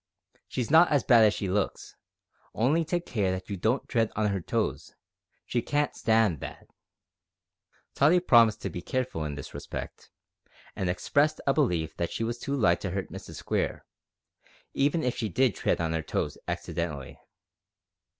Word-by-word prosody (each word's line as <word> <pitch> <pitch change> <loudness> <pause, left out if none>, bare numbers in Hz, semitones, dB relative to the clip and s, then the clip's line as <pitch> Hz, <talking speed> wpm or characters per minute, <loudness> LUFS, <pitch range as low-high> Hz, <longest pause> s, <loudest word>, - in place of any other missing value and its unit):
She's 125 +1 -3
not 165 +3 +7
as 145 -3 +2
bad 115 -3 +6
as 105 - +4
she 100 - -3
looks; 95 +2 -2 0.6
only 145 +9 +2
take 175 +2 -2
care 105 -6 0
that 95 +2 -4
you - - -1
don't 110 +8 0
tread 115 -2 +1
on 105 0 +1
her 95 -2 -2
toes; - - -2 0.5
she 120 - -1
can't 145 +4 -1
stand 110 -8 +2
that." - - -8 1.3
Tottie 155 +6 +4
promised 115 -10 +4
to 100 - -3
be 90 - -5
careful 130 -8 -2
in 75 -1 -4
this 70 - -8
respect, - - -7 0.7
and 95 - -1
expressed 145 +12 +1
a 140 - +3
belief 90 - 0
that 85 - -2
she - - -3
was 120 +1 -3
too 140 +3 -2
light 85 -10 +2
to 95 - -3
hurt 95 +1 -4
Mrs - - -9
Square, - - -2 0.9
even 145 +4 +1
if 125 - 0
she 110 - -2
did 125 +3 +2
tread - - 0
on 80 -1 -1
her 80 - -1
toes - - -2
accidentally. 70 -5 -4
110 Hz, 170 wpm, -28 LUFS, 90-135 Hz, 1.3 s, not